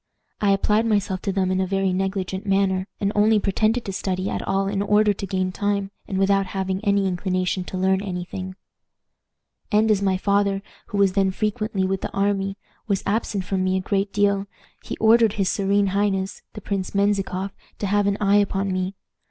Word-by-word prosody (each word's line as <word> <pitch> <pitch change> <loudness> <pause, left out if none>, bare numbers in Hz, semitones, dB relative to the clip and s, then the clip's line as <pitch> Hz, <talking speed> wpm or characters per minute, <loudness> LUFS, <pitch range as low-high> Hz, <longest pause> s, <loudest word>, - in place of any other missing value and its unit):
I 205 - +3
applied 210 +3 +2
myself 200 -3 0
to 195 - -1
them 190 -1 0
in 185 0 +1
a 190 - 0
very 195 0 0
negligent 190 0 -2
manner, 195 -1 +1
and 200 0 0
only 215 +1 +4
pretended 215 +4 +1
to 195 - -4
study 185 0 -2
at - - -2
all 195 0 0
in 195 0 -1
order 210 +1 +3
to 195 0 -6
gain 185 0 -1
time, 200 +1 -1 0.2
and 190 - -3
without 195 0 +2
having 190 0 -2
any 200 -2 +2
inclination 185 0 -1
to 185 - -5
learn 190 +1 +2
any 180 -3 -4
thing. 185 0 -6 1.2
"And 215 +1 +4
as 205 -2 +2
my 190 -2 +2
father, 200 0 +1 0.2
who 205 - -4
was 195 -2 +3
then 195 -1 +2
frequently 210 -1 -1
with 190 0 -1
the - - -4
army, 195 0 0 0.3
was 200 -3 0
absent 205 -1 -1
from 185 0 -1
me 185 0 +1
a - - -1
great 195 +1 -1
deal, 200 -1 +1 0.4
he - - -6
ordered 225 -1 +5
his 195 -3 0
serene 200 0 +2
highness, 195 -1 0
the 210 - -8
Prince 195 -1 -3
Menzikoff, 200 -1 0 0.3
to - - -3
have 205 +1 +2
an 200 0 +1
eye 205 0 +4
upon 195 -1 +1
me. 185 +1 -2
195 Hz, 195 wpm, -23 LUFS, 190-205 Hz, 1.2 s, ordered